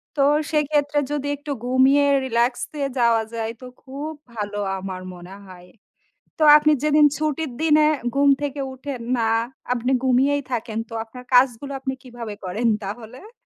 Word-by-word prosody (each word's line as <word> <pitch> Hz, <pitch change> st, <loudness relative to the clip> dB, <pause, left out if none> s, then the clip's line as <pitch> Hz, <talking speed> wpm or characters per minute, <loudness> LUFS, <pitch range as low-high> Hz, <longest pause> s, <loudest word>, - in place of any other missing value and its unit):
তো 280 Hz, -, +2 dB, 0.3 s
সেক্ষেত্রে 295 Hz, -1 st, +1 dB
যদি 285 Hz, -1 st, -2 dB
একটু 290 Hz, +1 st, -7 dB
ঘুমিয়ে 265 Hz, +3 st, +4 dB, 0.2 s
রিল্যাক্সে 245 Hz, +4 st, -1 dB, 0.2 s
যাওয়া 230 Hz, -1 st, +3 dB
যায় 225 Hz, 0 st, -3 dB
তো -, -, -9 dB, 0.2 s
খুব 280 Hz, +4 st, -6 dB, 0.2 s
ভালো 205 Hz, -1 st, -4 dB, 0.2 s
আমার 185 Hz, -1 st, -6 dB
মনে 180 Hz, +2 st, -11 dB
হয়। 180 Hz, -1 st, -13 dB, 0.7 s
তো -, -, -1 dB
আপনি 300 Hz, 0 st, +4 dB
যেদিন 300 Hz, 0 st, +4 dB
ছুটির 310 Hz, -1 st, -2 dB
দিনে 305 Hz, -1 st, +4 dB, 0.3 s
ঘুম 280 Hz, 0 st, +3 dB
থেকে 285 Hz, 0 st, -3 dB
উঠেন 260 Hz, -1 st, -6 dB, 0.2 s
না, 225 Hz, -1 st, +1 dB, 0.4 s
আপনি 250 Hz, +1 st, -1 dB
ঘুমিয়েই 275 Hz, +3 st, +2 dB
থাকেন 225 Hz, -2 st, -3 dB
তো 230 Hz, -, -9 dB
আপনার 250 Hz, +3 st, -12 dB
কাজগুলো 255 Hz, +2 st, +3 dB
আপনি 265 Hz, 0 st, -3 dB
কিভাবে 235 Hz, -4 st, -8 dB
করেন 205 Hz, +6 st, -2 dB, 0.2 s
তাহলে? 240 Hz, -, -9 dB
260 Hz, 145 wpm, -22 LUFS, 230-290 Hz, 0.7 s, ঘুমিয়ে